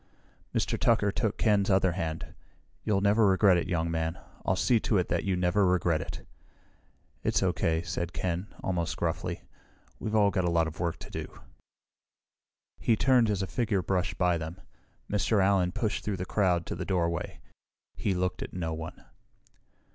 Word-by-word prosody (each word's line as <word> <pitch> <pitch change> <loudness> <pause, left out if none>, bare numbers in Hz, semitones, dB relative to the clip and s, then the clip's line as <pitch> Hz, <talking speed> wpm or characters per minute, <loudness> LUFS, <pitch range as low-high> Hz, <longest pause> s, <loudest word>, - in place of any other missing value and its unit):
Mr. - - -1
Tucker 110 -3 +3
took 110 +1 -1
Ken's 105 -3 +2
other 95 -1 +4
hand. 80 -3 -4 0.5
"You'll 100 -2 +1
never 105 +2 +4
regret 95 -1 +5
it, 85 - -1
young 85 -3 0
man. 80 +1 -1 0.3
I'll 95 - +1
see 120 +4 +3
to 105 - +1
it 90 - 0
that - - 0
you 95 -2 +1
never 90 +3 +2
regret 90 -4 +2
it." - - -7 1.0
"It's - - +1
okay," 80 0 +1
said 85 0 -3
Ken, 90 +2 -2 0.2
almost 85 -3 -1
gruffly. - - -2 0.6
"We've 110 - -2
all 100 -2 +4
got 95 -2 0
a 90 - +1
lot 85 -1 +3
of 80 0 -7
work 85 -1 -1
to - - -11
do." - - -7 1.4
He 115 - +3
turned 125 -1 +4
as 100 -2 0
a - - 0
figure 105 -3 0
brushed 90 +1 -1
by 90 -2 +2
them. 80 +3 -6 0.5
Mr. 105 +1 +1
Allen 95 -2 +3
pushed 110 +1 -2
through 105 -3 -2
the 90 - -3
crowd 90 -4 +1
to - - -4
the 85 - -4
doorway. 85 -3 -1 0.6
He 95 - -1
looked 90 0 -1
at - - -6
no 80 -3 -2
one. 80 +2 -7
95 Hz, 175 wpm, -29 LUFS, 85-100 Hz, 1.4 s, regret